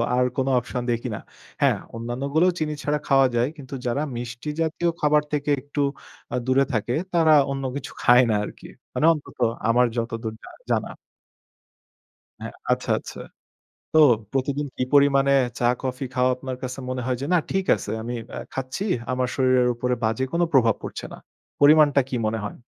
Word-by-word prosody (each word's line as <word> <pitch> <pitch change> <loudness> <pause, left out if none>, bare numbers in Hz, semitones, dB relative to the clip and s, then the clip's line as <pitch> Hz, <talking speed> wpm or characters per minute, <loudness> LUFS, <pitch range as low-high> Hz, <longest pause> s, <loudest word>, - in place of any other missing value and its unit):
আর 125 0 +3
কোনো 130 0 +1
অপশন 125 +1 -5
দেখি 120 +2 -2
না। - - -6 0.4
হ্যাঁ, - - +4 0.2
অন্যান্যগুলোও 140 +9 0
চিনি 155 -1 -1
ছাড়া 150 0 +1
খাওয়া 135 -1 +5
যায়। 120 +1 +2
কিন্তু 140 -2 -10
যারা 125 +4 0 0.2
মিষ্টি 120 +4 -6
জাতীয় 165 +2 0
খাবার 150 0 +3
থেকে 150 0 -1
একটু 145 +2 -7 0.5
আ - - +1
দূরে 130 +1 +3
থাকে, 115 +2 -1 0.2
তারা 165 -2 +4 0.2
অন্য 135 0 -3
কিছু 140 -1 -6
খায় 125 +1 +6
না 110 - +2
আরকি। - - -9 0.3
মানে - - +1
অন্তত 150 -4 -10 0.3
আমার 125 +2 +4
যতদূর 115 -1 -3
জা - - -11 0.2
জানা। - - 0 1.5
হ্যাঁ, - - -7 0.2
আচ্ছা, - - 0
আচ্ছা। - - -10 0.7
তো 160 - +6 0.3
প্রতিদিন 140 +2 -1
কি - - -1
পরিমাণে 140 -1 +5 0.3
চা-কফি 125 +2 -1
খাওয়া, 125 0 +2
আপনার 130 -1 -6
কাছে 130 +1 -5
মনে 130 0 -2
হয় 125 -1 -1
যে, - - -2
"না, 180 - +6
ঠিক 190 -1 0
আছে, 105 - -6
আমি 120 +2 -4
বে - - -8 0.2
খাচ্ছি? 135 +9 -4 0.3
আমার 130 0 0
শরীরের 130 -2 +3
উপরে 125 +1 -1
বাজে 110 +3 0
কোনো 175 +1 +2
প্রভাব 115 -5 +4
পড়ছে - - -6
না।" - - -9 0.4
পরিমাণটা 145 -1 +6
কী 130 - -2
মনে 110 +1 -1
হয়? 105 - -7
130 Hz, 170 wpm, -24 LUFS, 120-145 Hz, 1.5 s, খায়